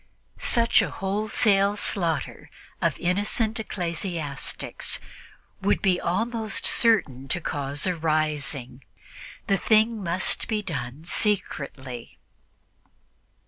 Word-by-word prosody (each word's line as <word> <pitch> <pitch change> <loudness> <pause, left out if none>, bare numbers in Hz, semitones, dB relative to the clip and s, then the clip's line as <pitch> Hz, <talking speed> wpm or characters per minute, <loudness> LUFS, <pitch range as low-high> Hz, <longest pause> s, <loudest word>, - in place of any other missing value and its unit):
Such 235 -1 +4
a 190 - -1
wholesale 200 +2 +2
slaughter 175 -5 -2 0.3
of - - +1
innocent 210 +5 0
ecclesiastics 170 -7 -2 0.6
would 100 - +2
be 185 -2 +2
almost 220 +5 -1
certain 145 - +3
to 175 - +1
cause 145 -3 -3
a 185 -1 +1
rising; 150 -5 -2 0.6
the 195 - +2
thing 220 +1 +3
must 175 +1 +2
be 215 -2 -1
done 150 -4 -5
secretly. 140 - -2
180 Hz, 95 wpm, -25 LUFS, 150-210 Hz, 0.6 s, Such